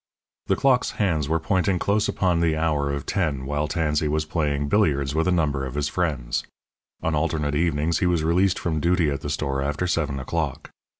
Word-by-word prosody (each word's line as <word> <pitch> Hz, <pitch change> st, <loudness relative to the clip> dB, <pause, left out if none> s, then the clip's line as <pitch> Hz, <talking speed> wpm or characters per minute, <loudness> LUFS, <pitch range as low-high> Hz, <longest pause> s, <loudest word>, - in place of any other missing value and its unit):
The -, -, +3 dB
clock's 130 Hz, -2 st, +2 dB
hands 80 Hz, -8 st, 0 dB
were 80 Hz, 0 st, +2 dB
pointing 95 Hz, +2 st, +1 dB
close 100 Hz, +4 st, +1 dB
upon 90 Hz, -3 st, +1 dB
the 80 Hz, -2 st, +1 dB
hour 75 Hz, -3 st, 0 dB
of 70 Hz, -1 st, -4 dB
ten 75 Hz, -9 st, -1 dB
while 75 Hz, +2 st, -1 dB
Tansey 75 Hz, -1 st, 0 dB
was 75 Hz, +1 st, 0 dB
playing 75 Hz, -3 st, -1 dB
billiards 70 Hz, -7 st, +2 dB
with 80 Hz, +3 st, +1 dB
a -, -, +3 dB
number 75 Hz, -6 st, +1 dB
of 65 Hz, 0 st, -5 dB
his 75 Hz, 0 st, 0 dB
friends. 70 Hz, -10 st, -1 dB, 0.6 s
On 80 Hz, -, 0 dB
alternate 75 Hz, -1 st, 0 dB
evenings 80 Hz, +1 st, +1 dB
he 90 Hz, -, +2 dB
was 85 Hz, -3 st, +1 dB
released 90 Hz, +3 st, +2 dB
from 80 Hz, -3 st, -1 dB
duty 85 Hz, -1 st, +2 dB
at 70 Hz, -1 st, -3 dB
the 75 Hz, -, -4 dB
store 70 Hz, -2 st, -1 dB
after 75 Hz, +5 st, -1 dB
seven 75 Hz, -5 st, -1 dB
o'clock. 75 Hz, +2 st, -3 dB
80 Hz, 195 wpm, -24 LUFS, 70-85 Hz, 0.6 s, The